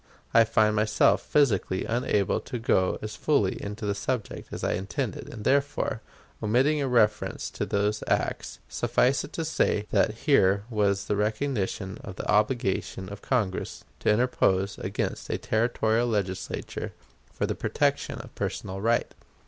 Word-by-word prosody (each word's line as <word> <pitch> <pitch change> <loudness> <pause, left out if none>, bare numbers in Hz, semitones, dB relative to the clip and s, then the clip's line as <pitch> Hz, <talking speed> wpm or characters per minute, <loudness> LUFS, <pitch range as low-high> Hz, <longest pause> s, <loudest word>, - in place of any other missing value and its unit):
I 115 0 +7
find 105 0 +3
myself 110 0 +3
physically 105 -10 +1
unable 110 -4 +1
to 125 - -6
go 95 -5 +2
as 110 - -5
fully 140 -11 +1
into 105 +1 -5
the 100 - +1
subject 105 +2 -3
as - - -6
I - - +1
intended, 105 +5 -3
and 110 -3 -8
therefore, 140 +3 +1 0.4
omitting 130 +8 +2
a 140 - 0
reference 115 -4 +1
to - - -3
those 105 +1 0
acts, - - -1
suffice 130 +2 +1
it 145 - -9
to 165 - -2
say 105 -9 +1
that 105 - +2
here 100 -9 +4
was 100 -2 +1
the 105 - 0
recognition 105 -3 -1
of 95 - -7
the - - -6
obligation 105 -4 0
of 100 0 -8
Congress 110 -8 -1 0.2
to - - 0
interpose 105 -4 +2
against - - -3
a - - 0
Territorial 115 +1 +1
Legislature 95 -4 -3 0.4
for - - -1
the - - -1
protection - - 0
of - - -14
personal 95 +1 -4
right. 115 +2 +1
105 Hz, 150 wpm, -27 LUFS, 100-125 Hz, 0.4 s, I